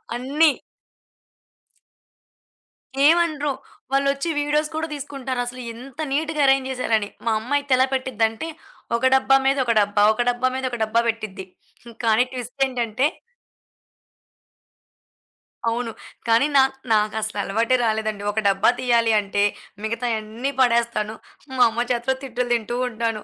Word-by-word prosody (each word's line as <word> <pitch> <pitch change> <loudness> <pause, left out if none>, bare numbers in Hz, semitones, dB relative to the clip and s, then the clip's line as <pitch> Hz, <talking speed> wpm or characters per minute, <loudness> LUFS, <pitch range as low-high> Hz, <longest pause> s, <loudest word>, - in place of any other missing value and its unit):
అన్ని. 285 +6 +3 2.6
ఏమనరు. 310 -3 +2 0.4
వాళ్లొచ్చి 275 +3 +1
వీడియోస్ 300 +1 0
కూడా 320 +1 -2
తీసుకుంటారసలు. 260 -3 -4
ఇంత 255 +5 -12
నీట్‌గా 310 +1 0
అరేంజ్ 270 -1 +3
జేసారని. 225 -5 0 0.2
మా 230 - +2
అమ్మయితే 280 +3 0
ఎలా 260 - +4
పెట్టిదంటే, 235 0 -1 0.5
ఒక 245 - -1
డబ్బా 270 0 +4
మీద 275 - +3
ఒక 235 - +2
డబ్బా, 205 0 +2
ఒక 220 - -2
డబ్బా 245 +1 +1
మీద 265 0 -3
ఒక 240 - -3
డబ్బా 220 +2 +2
పెట్టిద్ది. 215 -4 -4 0.6
కానీ, 225 +2 +4
ట్విస్ట్ 250 +1 -7
ఏంటంటే 245 0 -1 2.6
అవును, 230 0 -1 0.4
కానీ 230 +3 +4
నాక్ 265 0 +4 0.2
నాకసల 215 0 0
అలవాటే 230 +6 +1
రాలేదండి 215 -2 -1
ఒక 215 - -1
డబ్బా 195 +2 +3
తీయాలి 235 -3 +2
అంటే, 200 0 0 0.4
మిగతాయన్ని 230 +2 -2
పడేస్తాను. 235 -3 +1 0.4
మా 250 - +6
అమ్మ 235 +2 -2
చేతిలో 245 +2 0
తిట్టులు 250 -1 -3
తింటూ 235 +1 -3
ఉంటాను. 225 -2 -3
245 Hz, 120 wpm, -22 LUFS, 220-270 Hz, 2.6 s, మా